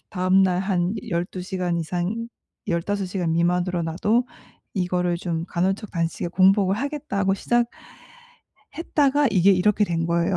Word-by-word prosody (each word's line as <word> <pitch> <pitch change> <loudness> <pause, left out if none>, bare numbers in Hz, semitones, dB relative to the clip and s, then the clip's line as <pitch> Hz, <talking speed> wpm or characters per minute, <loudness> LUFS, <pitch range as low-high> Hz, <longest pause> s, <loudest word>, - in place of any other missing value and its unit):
다음날 185 -1 +3
한 185 -1 0 0.2
12 180 +1 -2
시간 180 -2 -2
이상 180 +8 -3 0.4
15 190 +3 -1
시간 180 -3 -1
미만으로 175 +1 +1
나도 210 +10 +1 0.5
이거를 180 -2 0
좀 165 -2 -3
'간헐적 190 +4 -1
단식에 170 0 -2
공복을 190 +2 +3
하겠다.'고 265 -8 -1
시작했다가 290 - -2
이게 195 -1 +4
이렇게 205 +3 +3
된 165 -2 -1
거예요. 170 +2 +1
185 Hz, 270 characters per minute, -23 LUFS, 175-210 Hz, 0.5 s, 이게